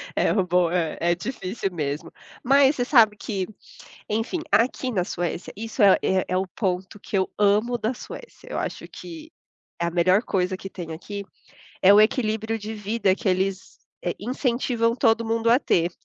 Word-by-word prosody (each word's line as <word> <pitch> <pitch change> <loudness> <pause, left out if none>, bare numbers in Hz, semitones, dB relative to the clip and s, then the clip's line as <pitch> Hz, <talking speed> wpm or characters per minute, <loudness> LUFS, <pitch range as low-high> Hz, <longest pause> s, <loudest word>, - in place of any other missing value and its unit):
É - - +2
bom, 180 -3 +2
é, 170 -3 -1
é 170 +1 +2
difícil 195 -1 -4
mesmo, 145 -2 -3 0.3
mas 275 +2 +5
você 245 -2 -1
sabe 220 -6 +5
que, 195 -4 -3 0.6
enfim, 225 - -1
aqui 255 +2 +2
na 195 -7 0
Suécia, 175 -1 -4
isso 225 +1 -3
é 195 -2 +7
é 190 0 +1
é 185 - 0
o 190 +1 0
ponto 190 +1 -3
que 200 - -4
eu 190 -1 +1
amo 210 +4 +2
da 230 +3 -1
Suécia. 475 - -11
Eu - - -3
acho - - -4
que 325 -2 -10 0.5
a 170 0 0
melhor 185 +5 +3
coisa 185 -3 -1
que 195 - -7
tem 165 -3 -7
aqui 200 +5 -7 0.6
é 190 - +7
o 210 - +7
equilíbrio 220 0 +1
de 215 +2 -6
vida 210 -2 0
que 210 - -4
eles, 190 +1 -2 0.2
eh, 175 - -1
incentivam 235 0 0
todo 230 -2 +2
mundo 230 +1 +1
a 240 - +6
ter. 170 - +1
205 Hz, 175 wpm, -24 LUFS, 185-230 Hz, 0.6 s, é